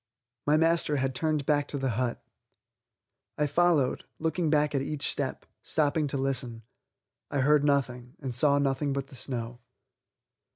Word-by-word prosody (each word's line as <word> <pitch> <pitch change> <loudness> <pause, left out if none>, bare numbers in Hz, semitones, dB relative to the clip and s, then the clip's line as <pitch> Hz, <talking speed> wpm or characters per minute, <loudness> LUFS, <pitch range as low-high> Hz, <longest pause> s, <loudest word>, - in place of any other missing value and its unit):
My 150 +1 +5
master 165 -1 +2
had 135 -1 0
turned 155 +1 -1
back 145 -1 +2
to 145 - -3
the 135 -2 -1
hut. 120 +2 -2 1.1
I 150 - +2
followed, 150 -3 +2
looking 160 +1 0
back 150 -1 +2
at 140 - +1
each 145 +1 -1
step, - - -1 0.2
stopping 150 0 0
to 140 - -2
listen. 130 -4 -2 0.7
I 140 - 0
heard 145 +2 +4
nothing, 125 -4 0
and 130 -2 -4
saw 140 +3 +4
nothing 140 0 0
but 135 0 -4
the - - -12
snow. 120 0 -5
140 Hz, 155 wpm, -28 LUFS, 130-150 Hz, 1.1 s, My